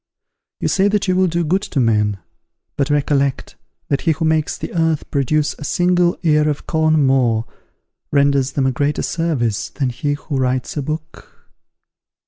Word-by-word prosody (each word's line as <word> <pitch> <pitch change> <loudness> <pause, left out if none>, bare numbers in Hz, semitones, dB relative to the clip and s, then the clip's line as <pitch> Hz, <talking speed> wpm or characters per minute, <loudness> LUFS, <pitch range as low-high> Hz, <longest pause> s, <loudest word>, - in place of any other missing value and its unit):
You - - -1
say 195 +1 +2
that 205 -1 0
you 185 - +2
will 185 0 +3
do 170 0 0
good 180 +5 +1
to 155 - -3
men; 105 -4 +2 0.6
but 140 0 0
recollect, 140 -2 0 0.3
that 140 - 0
he 165 - +2
who 160 +2 -3
makes 160 -1 +1
the - - -6
earth 160 -3 0
produce 145 +2 +1
a - - -7
single 175 +2 +2
ear 150 -2 +3
of 150 - -3
corn 155 -2 +2
more, 120 -4 +2 0.7
renders 140 -2 +2
them 135 - 0
a 130 - +2
greater 145 +3 -1
service 135 -11 -1
than 135 -3 -2
he 145 +4 -2
who 145 -1 -4
writes 130 -1 -1
a 145 - -1
book. 155 +3 -8
145 Hz, 170 wpm, -19 LUFS, 135-160 Hz, 0.7 s, will